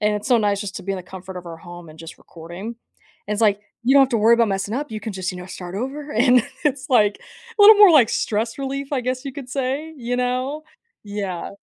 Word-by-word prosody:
and 210 0 +1
it's 210 +6 -4
so 245 - +5
nice 205 -2 0
just 200 -2 -6
to - - -7
be 195 - -2
in - - -3
the - - -8
comfort 190 0 -10
of 180 - -8
our 165 -1 -8
home 175 0 -11
and 155 0 -14
just 165 +1 -10
recording, 170 +4 -10 0.6
and 210 - 0
it's 210 - -3
like, 205 -2 +3 0.2
you 265 - +4
don't 280 - +8
have 265 - +2
to 235 - +1
worry 225 +2 +5
about 235 -1 +3
messing 195 +1 -2
up; 290 +3 -4
you 215 - -5
can 215 0 -5
just, 185 -1 -3
you - - -8
know, 180 - -8
start 180 -1 -8
over, 280 +6 -5
and 245 +1 +4 0.2
it's 280 -2 -1
like 210 -5 +3 0.4
little 415 +1 +10
more 410 -2 +8
like 265 -8 +6
stress 225 +2 -1
relief, 275 +1 -4
I 270 - +1
guess, 255 +2 -3
you 275 - -5
could 265 -1 -9
say, 275 +4 -3
you 245 -2 -3
know? 255 +4 -2 0.4
Yeah. 200 -4 -5
225 Hz, 260 wpm, -21 LUFS, 195-265 Hz, 0.6 s, little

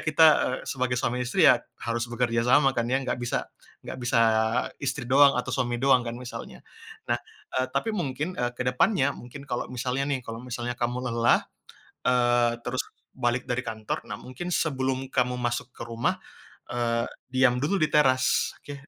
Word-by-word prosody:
kita 155 +1 +4 0.4
sebagai 130 -2 -1
suami 125 +1 -1
istri 125 - +2
ya - - +7 0.2
harus 115 0 -1
bekerja 120 -1 0
sama 135 +1 +5
kan 120 -1 -1
ya, 130 - +2
gak 125 - -2
bisa 120 0 -1 0.4
gak - - -6
bisa 120 -1 +1 0.6
istri 140 -1 -2
doang 140 +3 +6
atau 125 - -2
suami 120 -2 0
doang 130 +1 +4
kan 115 0 -4
misalnya. 125 0 -8 0.4
Nah, - - +1 0.4
eee, 130 - 0
tapi 180 +11 0
mungkin, 160 -3 -2
eee, 120 - +1
ke - - -2
depannya 140 - +2
mungkin 140 +4 -10
kalau 120 -3 -3
misalnya 130 +2 -2
nih, 135 -2 0
kalau 115 0 -6
misalnya 120 -1 -4
kamu 120 +1 0
lelah 115 0 +3 1.2
terus, 130 +2 -1
eee, - - -24
balik 120 0 0
dari 125 +1 -1
kantor. 110 -2 -4
Nah, - - -4
mungkin 130 +8 -7
sebelum 135 -5 0
kamu 125 -1 +1
masuk 120 0 -2
ke - - -8
rumah, 115 0 -1 0.5
eee, 115 -1 0 0.3
diam 130 -1 +4
dulu 180 +5 0
di 155 - +3
teras, 130 -4 +3
oke. 145 - -8
125 Hz, 170 wpm, -26 LUFS, 120-135 Hz, 1.2 s, ya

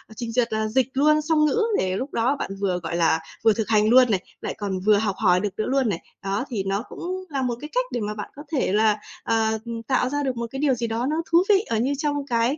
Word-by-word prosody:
trình 235 0 -5
duyệt 235 -1 0
là 220 0 0
dịch 255 +3 +1
luôn 305 +3 +4
song 305 0 +2
ngữ, 445 +9 +2 0.2
để 185 0 0
lúc 265 +3 -5
đó 245 +5 +1
bạn - - -4
vừa, 185 -3 0
gọi 165 +1 -3
là, 165 -1 +3 0.2
vừa 225 -1 +5
thực 220 0 -2
hành 215 -1 +4
luôn 250 -1 +6
này, 195 - +2 0.2
lại - - -3
còn 195 -3 -3
vừa 205 +2 +4
học 205 -2 0
hỏi 180 -4 +3
được 205 +2 -1
nữa 215 - -1
luôn 265 -3 +1
này. 175 -5 -2 0.2
Đó, 200 +6 -1
thì 210 -6 -2
nó 200 +3 -1
cũng 370 +2 -5
là 275 -3 -2
một 250 -2 -1
cái 300 - -7
cách - - +1
để 240 - -2
mà 210 0 -2
bạn 210 -1 -6
có 290 - -9
thể 275 -10 0
là, 215 0 +3 0.3
ờ, 220 -1 +1
ừm, 230 -1 -5
tạo 255 0 +1
ra 290 +1 -1
được 260 -3 -2
một 235 0 -3
cái 270 - -5
điều 285 -3 +3
gì 235 -1 -2
đó 225 +2 -2
nó 310 - 0 0.2
thú 340 +2 +6
vị, 395 -2 +6
ờ, 225 - +1
như 260 +5 +1
trong 295 -1 -1
cái 240 +3 +1
230 Hz, 280 wpm, -24 LUFS, 210-275 Hz, 0.3 s, luôn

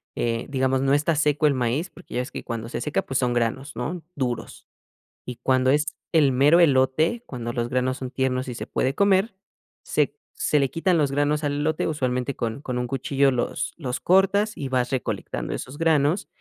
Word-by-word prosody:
eh, 115 -1 -1
digamos, 130 -1 +1
no 135 0 +2
está 150 +3 +2
seco 150 0 +2
el 140 - +3
maíz, 130 +8 -1
porque 180 - -12
ya - - +1
ves 125 - -4
que - - -6
cuando 115 -1 -5
se 120 - -4
seca, 150 - 0
pues 135 - -1
son 125 -1 +1
granos, 120 +2 -2
¿no?, 170 +8 -3
duros, 125 -4 -4 0.6
y 125 -1 -6
cuando 130 0 +2
es 150 +3 +1 0.2
el 150 -5 +4
mero 145 +7 +5
elote, 155 - +3
cuando 120 -2 -5
los 120 0 -2
granos 130 +1 0
son 130 -2 -6
tiernos 130 -1 -1
y 125 - -4
se - - -6
puede 130 - 0
comer, 200 +4 +3 0.5
se - - 0 0.2
se 150 - +2
le 135 -2 +1
quitan 175 +1 +1
los 145 -3 +1
granos 145 +2 +1
al 145 - 0
elote, 150 +2 0
usualmente 130 -3 -1
con 115 +3 -3
con 125 -4 -4
un 125 - -1
cuchillo 135 +1 +1
los 120 -1 -2
los 130 -6 -3
cortas, 200 +3 +3
y 140 - -4
vas 125 -1 0
recolectando 130 -2 -3
esos 135 +4 -8
granos, 160 +1 +2
135 Hz, 200 wpm, -24 LUFS, 125-155 Hz, 0.6 s, mero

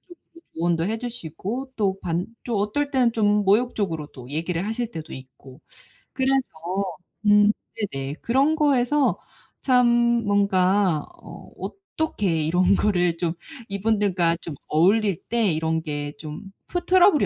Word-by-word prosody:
쪽으로 335 -1 -18
조언도 170 0 +1
해주시고 230 - -4
또 195 -3 0
반 175 0 -2 0.2
또 235 -4 -1
어떨 280 +8 -1
때는 250 -3 +3
좀 210 -2 +2
모욕적으로 200 -7 +1
또 125 0 -11
얘기를 165 +3 -2
하실 225 +1 -2
때도 160 -1 -7
있고. 130 +1 -13 0.5
그래서 265 0 +1 0.8
음 205 0 +6 0.4
네네. 135 +1 -4
그런 275 +6 +2
거에서 285 -1 +2 0.4
참 250 -2 +4 0.4
뭔가 195 -4 +2 0.2
어 - - -11
'어떻게 315 - -2
이런 180 +5 +3
거를 180 -5 +1
좀 165 -2 -1 0.4
이분들과 195 -4 +1
좀 160 -4 -7
어울릴 195 +4 +2
때 230 -5 +2
이런 160 +1 0
게 145 -2 -4
좀 155 +6 -8 0.2
프 355 - -3
트러블이 365 -3 +5
200 Hz, 255 characters per minute, -24 LUFS, 165-245 Hz, 0.8 s, 음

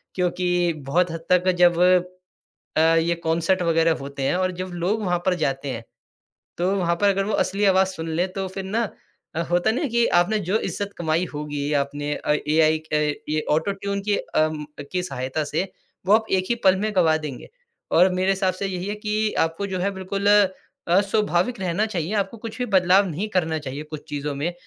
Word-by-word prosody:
क्योंकि 180 -1 +1
बहुत 175 +4 +2
हद 165 0 -7
तक 180 +1 +4
जब 175 -1 +5 1.0
अ, - - +4
ये 165 +1 +3
कॉन्सर्ट 170 +3 +1
वग़ैरह 165 -1 +3
होते 140 0 -6
हैं 135 - +1
और 185 0 0
जब 185 - -6
लोग 215 +3 0
वहाँ 175 -1 +1
पर 185 - +3
जाते 135 +1 -2
हैं, 115 -1 -6 0.7
तो 180 +2 +1
वहाँ 170 -2 +1
पर 205 - +4
अगर 195 0 +1
वो 210 - -2
असली 200 +1 0
आवाज 190 -1 +4
सुन 165 -3 -6
लें 180 +2 +2
तो 195 0 -3
फिर 190 +1 -6
ना 220 +3 -1 0.5
अ, 165 - -1
होता 175 +5 +2
नहीं 260 +5 -1
कि 235 0 +3 0.2
आपने 215 +4 -1
जो 215 - +3
इज्जत 200 -2 -4
कमाई 165 +1 +1
होगी 145 -1 -3
आपने 145 +1 -4
अ, 150 - -1 0.2
एआई 155 0 +4
क 150 -1 +1
ये 155 0 -1
ऑटो-ट्यून 200 +5 -1
की 205 - +3
अम, 155 -1 -1 0.3
की 180 -1 0
सहायता 135 -2 -3
से 170 +6 -2 0.4
वो 200 - +4
आप 220 0 +3
एक 185 -1 +2
ही 240 - +2
पल 190 0 +6
में 215 0 -1
गँवा 160 -3 +4
देंगे। 150 -5 -7 0.4
और 180 +3 +6
मेरे 185 +1 +1
हिसाब 190 -1 +1
से 195 +1 -3
यही 185 -1 -4
है 205 - -2
कि 210 0 -1
आपको 165 +5 0
जो 190 -1 -3
है 195 +3 0
बिल्कुल 195 +1 -4 0.6
अ, 180 +3 +5
स्वाभाविक 205 +1 0
रहना 185 +4 0
चाहिए, 185 -3 -3
आपको 200 +1 -1
कुछ 225 +1 -8
भी 250 - -1
बदलाव 190 -1 +4
नहीं 180 +6 -3
करना 165 -5 0
चाहिए 145 0 -6
कुछ 155 -1 -7
चीज़ों 145 0 -3
में। 155 +5 -2
180 Hz, 200 wpm, -23 LUFS, 160-195 Hz, 1.0 s, पल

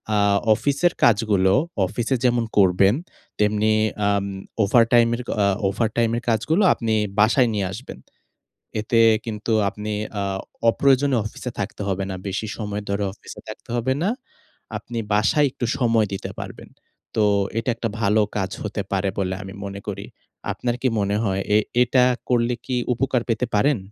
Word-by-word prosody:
আ - - +3 0.4
অফিসের 145 +8 +1
কাজগুলো 105 -5 +4 0.3
অফিসে 120 +7 -1
যেমন 120 -1 +2
করবেন 95 +1 +5 0.4
তেমনি 105 +1 +2 0.4
আম 100 -1 +1 0.4
ওভারটাইমের 115 +2 +4 0.2
অ - - +4 0.2
ওভারটাইমের 115 +3 0
কাজগুলো 135 - +2
আপনি 115 -2 -2 0.3
বাসায় 120 +3 +4
নিয়ে 100 -3 -1
আসবেন। 110 - -9 0.8
এতে 115 +2 +1 0.3
কিন্তু 110 0 -4 0.2
আপনি 105 +1 -6 0.3
আ - - -1 0.5
অপ্রয়োজনীয় 135 +1 +3
অফিসে 120 +3 -6
থাকতে 100 +1 -4
হবে 95 0 -1
না। 95 - -3
বেশি 100 +3 -3
সময় 105 -2 -4
ধরে 100 +1 0
অফিসে - - -12
থাকতে - - -10
হবে 120 +2 +1
না। 190 - +2 0.7
আপনি 120 - -8 0.2
বাসায় 140 +8 +3
একটু 125 - -4
সময় 115 -4 +3
দিতে 95 - -4
পারবেন। - - -8 0.5
তো 110 - +3 0.4
এটা 115 - -3
একটা 115 0 -3
ভালো 105 +1 +3 0.2
কাজ 95 -2 -2
হতে 105 -1 -3
পারে 100 0 0
বলে 95 -1 -1
আমি 95 0 -9
মনে 100 0 -6
করি। 100 0 -5 0.5
আপনার 120 -1 -2
কি 135 - +2
মনে 100 0 0
হয় 95 -1 0
এ - - +7 0.3
এটা 125 +1 +3 0.3
করলে 120 -1 +2
কি 130 - -2 0.2
উপকার 125 0 0
পেতে 115 +2 +1
পারেন? 140 +6 +3
110 Hz, 150 wpm, -22 LUFS, 100-120 Hz, 0.8 s, এ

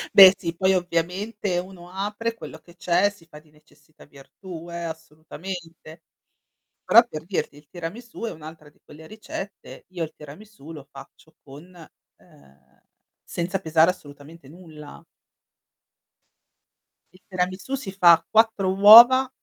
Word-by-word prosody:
Beh 195 -1 +9
sì, 170 -2 -6
poi 190 +2 +1
ovviamente 180 +3 -3
uno 180 -1 -11
apre 210 +4 -4
quello 160 - -11
che 170 +2 -21
c'è, 180 +3 +1
si 200 -5 -19
fa 150 -2 -14
di 155 0 -26
necessità 155 +1 -23
virtù 165 +5 -13
eh, 170 0 -6
assolutamente. 160 +1 -10 0.8
Però, 235 0 +6
per 155 -4 -9
dirti, 180 -5 -4
il 150 - -20
tiramisù 205 +8 -9
è 230 - -3
un'altra 155 -1 -13
di - - -33
quelle 160 +1 -15
ricette 215 -2 -10
io 180 -3 -5
il 155 - -7
tiramisù 160 +2 -14
lo 145 -3 -12
faccio 140 +3 -16
con, 150 +6 -15 0.4
ehm, 70 -1 -26 0.4
senza 180 +2 -4
pesare 160 +2 +2
assolutamente 145 -2 -16
nulla. 155 -3 -14 2.1
Il 185 - -22
tiramisù 185 +7 -4
si 230 -8 -7
fa 175 -4 +4
4 220 -4 +2
uova 235 +6 +8
175 Hz, 135 wpm, -23 LUFS, 155-195 Hz, 2.1 s, Beh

